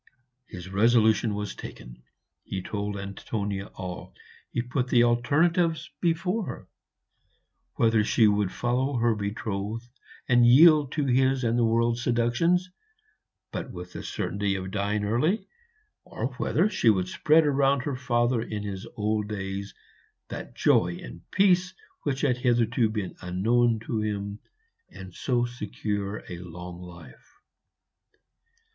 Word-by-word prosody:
His 90 0 -9
resolution 110 +1 +3
was 105 0 -4
taken. - - -10 0.4
He 95 -1 -5
told 100 0 -3
Antonia 100 0 -4
all; 90 -1 -8 0.3
he 120 - -2
put 125 +1 -2
the 120 -2 +4
alternatives 155 +7 +2
before 180 +5 0
her - - -7 1.1
whether 115 -2 +3
she 110 +1 +4
would 105 -2 +1
follow 130 +3 -1
her 120 0 +3
betrothed 105 +1 -4 0.4
and 120 -1 +5
yield 145 +3 +7
to 150 -3 0
his 130 0 +2
and 115 0 +1
the 120 - +2
world's 115 +1 +2
seductions, 130 +11 +1 0.8
but - - -5
with 90 0 -9
the - - -6
certainty 100 0 -2
of 95 0 -5
dying 105 +1 -1
early, 150 - +1 0.6
or 115 +4 -4
whether 175 +7 +2
she 125 - +2
would 95 -4 +2
spread 155 +10 +3
round 140 -2 +2
her 140 -1 -2
father 120 -1 +1
in 105 -2 -4
his 100 +1 -6
old 105 0 0
days 100 -1 -5 0.5
that - - -7
joy 85 0 +3
and - - -11
peace 185 -2 +3 0.3
which 135 -2 -2
had 125 -4 +2
hitherto 120 -2 +2
been 105 -4 -4
unknown 115 +6 +2
to 115 0 -3
him, 100 -1 -3 0.5
and 95 -1 -11
so 120 +2 0
secure 105 -3 -4
a 90 -3 -7
long 90 0 -9
life. 90 - -14
115 Hz, 135 wpm, -27 LUFS, 100-130 Hz, 1.1 s, yield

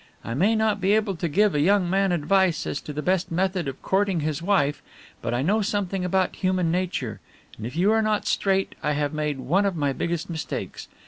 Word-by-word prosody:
I 115 - -3
may 195 - +2
not 215 -2 +1
be 195 +2 +3
able 215 -3 +1
to 170 0 -2
give 205 +6 +3
a 145 - +1
young 190 +4 +3
man 195 +1 +2
advice 175 +1 +2
as 145 - -3
to - - -7
the 150 +1 -4
best 185 -1 +1
method 180 -1 0
of 135 - -6
courting 190 -3 +1
his 155 +1 -2
wife, 170 -6 +1 0.4
but 115 - -2
I 120 +2 0
know 210 +8 +2
something 200 -3 -1
about 185 0 0
human 185 -3 +1
nature, 175 - -2 0.4
and 110 - -6
if 125 - -9
you 185 +5 +3
are 220 0 +3
not 215 -1 0
straight, 195 -1 +1
I 150 - 0
have 145 +1 -1
made 150 -2 -1
one 150 +10 +1
of 200 -3 0
my 145 -3 0
biggest 170 +3 -2
mistakes. 160 -3 -5
180 Hz, 220 wpm, -25 LUFS, 150-195 Hz, 0.4 s, be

